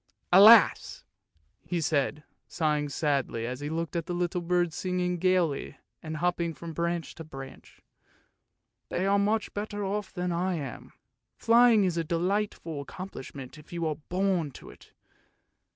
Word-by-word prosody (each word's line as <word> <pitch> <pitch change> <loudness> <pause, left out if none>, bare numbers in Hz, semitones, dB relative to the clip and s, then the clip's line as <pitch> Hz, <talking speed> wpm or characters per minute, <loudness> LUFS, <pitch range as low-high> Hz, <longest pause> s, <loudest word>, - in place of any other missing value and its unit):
Alas! 210 +4 +7 0.3
" 80 +1 -42
he 175 - +1
said, 150 -1 0 0.2
sighing 150 -3 0
sadly, 140 -6 -1
as 125 +2 -4
he 145 +1 -4
looked 165 +2 -3
at 170 0 -2
the 175 - -2
little 175 0 -1
birds 175 -1 0
singing 180 -1 -1
gaily 180 -5 +1 0.2
and 155 -1 -5
hopping 170 -1 -1
from 165 -1 -8
branch 170 0 -2
to 165 - -9
branch. 135 -4 -11 0.5
" - - -54
They 185 - -1
are 200 +1 +3
much 210 +2 0
better 205 0 -4
off 205 0 -3
than 180 -1 -3
I 180 +2 0
am. 140 -6 -7 0.5
Flying 230 -2 +5
is 180 -3 0
a 165 - +1
delightful 170 -2 -2
accomplish 185 -1 -9
ment 135 +2 -9
if 150 - -17
you 170 -1 -3
are 155 -2 -1
born 180 -4 0
to - - -11
it - - -18
170 Hz, 160 wpm, -28 LUFS, 155-185 Hz, 0.5 s, Alas